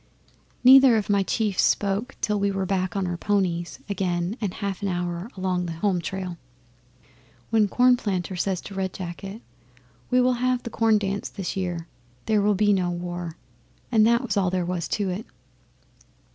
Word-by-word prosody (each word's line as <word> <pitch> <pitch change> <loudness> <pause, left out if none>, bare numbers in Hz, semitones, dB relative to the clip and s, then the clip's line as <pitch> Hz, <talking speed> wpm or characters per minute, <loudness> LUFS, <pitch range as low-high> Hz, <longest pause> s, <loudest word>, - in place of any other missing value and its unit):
'Neither 260 -2 +8
of 210 -1 -1
my 200 -1 +3
chiefs 205 0 0
spoke 205 +6 +1
till 210 -1 0
we 200 0 +1
were 195 -1 -1
back 185 -1 -1
on 195 -1 0
our 175 -1 -2
ponies 180 -3 -1
again 185 -1 -1
and 205 -4 -1
a - - -12
half 200 -2 -4
hour 175 +1 -2
along 180 -1 -1
the 165 - -4
home 180 +1 0
trail. 180 0 -5 1.1
Then 220 -2 +4
Cornplanter 205 -6 +2
says 185 0 -1
to 200 - -9
Red 190 -1 -2
Jacket, 195 +4 -7 0.7
"We 250 - +3
will 250 0 +4
have 255 -1 +1
the 235 - -6
Corn 225 0 +3
dance 200 -1 -2
this 195 -3 -5
year. 175 -3 -3 0.4
There 215 -2 +2
will 205 0 +3
be 205 +1 +3
no 185 -2 +1
war." 175 -1 -5 0.5
And 220 -3 +5
that 235 +2 +3
was 250 - -2
all 190 -3 +2
there 180 -1 -1
was 175 -1 -2
to 200 -3 -1
it. 195 +5 -5
195 Hz, 175 wpm, -25 LUFS, 180-210 Hz, 1.1 s, Neither